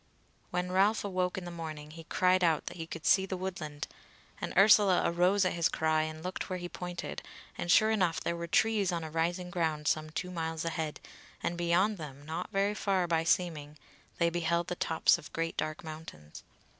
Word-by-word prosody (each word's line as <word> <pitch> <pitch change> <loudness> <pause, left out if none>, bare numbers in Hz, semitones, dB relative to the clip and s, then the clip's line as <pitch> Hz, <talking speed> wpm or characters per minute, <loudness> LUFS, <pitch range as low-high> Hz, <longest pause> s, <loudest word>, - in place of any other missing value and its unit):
When 180 0 -2
Ralph 200 +4 +3
awoke 185 -2 -1
in 185 - -5
the 175 - -6
morning 155 -3 -7
he 165 0 -10
cried 185 +2 +3
out 165 -3 +2
that - - -6
he 165 -1 -5
could 165 -1 -7
see 190 0 +4
the 185 - -3
woodland; 165 -6 -5 0.5
and - - -3
Ursula 195 -2 +6
arose 180 +3 +3
at 185 - +1
his 170 -1 +2
cry 155 0 +1
and 155 0 -5
looked 185 +2 -4
where 185 - -2
he 175 0 -5
pointed, 175 0 -6 0.3
and 175 - -4
sure 215 +3 +6
enough 180 -7 +1
there 170 - -2
were 170 0 -5
trees 210 +1 +2
on 170 -2 -2
a 160 - -6
rising 175 +3 -1
ground 160 -4 -1
some 155 0 +1
two 180 +4 -4
miles 160 -2 -3
ahead, 160 -2 -3 0.4
and 170 - -1
beyond 175 +4 +2
them, 145 -2 -8
not 160 +3 -4
very 200 0 +1
far 195 -3 +1
by 165 -1 +1
seeming, 155 -4 0 0.4
they 170 -1 +2
beheld 170 0 0
the 180 - -2
tops 160 -2 +3
of - - -12
great 165 0 -2
dark 155 +1 -3
mountains. 155 - -9
170 Hz, 200 wpm, -31 LUFS, 160-185 Hz, 0.5 s, Ursula